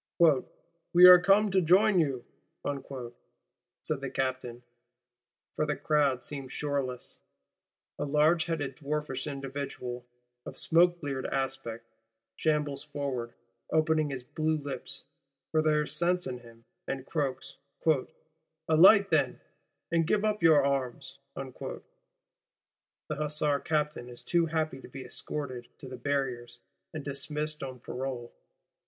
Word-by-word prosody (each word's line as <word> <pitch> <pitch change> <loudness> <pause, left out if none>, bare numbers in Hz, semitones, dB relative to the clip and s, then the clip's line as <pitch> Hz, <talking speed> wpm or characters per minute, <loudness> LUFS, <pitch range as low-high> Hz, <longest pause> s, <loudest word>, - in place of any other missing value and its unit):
'We 170 +2 +3
are 180 0 +11
come 195 +3 +4
to 190 0 +3
join 190 +4 +5
you,' 135 -6 0 1.6
said 150 -3 -2
the 135 - -3
Captain; 130 -2 -3 0.9
for 155 - 0
the 150 - 0
crowd 140 -5 +1
seems 135 -3 -3
shoreless. 140 -4 -3 0.8
A - - -1
large 155 +3 +3
headed 150 -5 -2
dwarfish 150 -2 -3
individual, 135 -3 -5 0.4
of - - -8
smoke 175 +1 +4
bleared 140 -4 -3
aspect, 135 -4 -3 0.5
shambles 150 -2 0
forward, 140 -5 -4 0.4
opening 155 -1 +2
his 135 -3 -5
blue 155 +4 -1
lips, 140 -3 -7 0.5
for 155 - +3
there 155 -1 +3
is 150 0 -3
sense 175 +2 +2
in 125 -1 -4
him; 115 -1 -17 0.2
and 135 -1 -4
croaks: 140 -5 -3 1.1
'Alight 195 +5 +7
then, - - +2 0.5
and 165 -1 +2
give 210 +3 +2
up 210 -2 0
your 155 -4 +6
arms!' 135 -3 -2 0.2
the - - -6 1.3
Hussar 150 -1 0
Captain 150 -5 -2
is 120 - -8
too 170 -1 +2
happy 155 -4 -2
to - - -11
be 135 -1 -9
escorted 130 -5 -4
to 135 - -10
the 130 - -7
Barriers, 125 -2 -2 0.3
and 155 -4 -6
dismissed 150 +2 -2
on 130 -2 -6
parole. 125 -1 -5
145 Hz, 125 wpm, -29 LUFS, 130-160 Hz, 1.6 s, are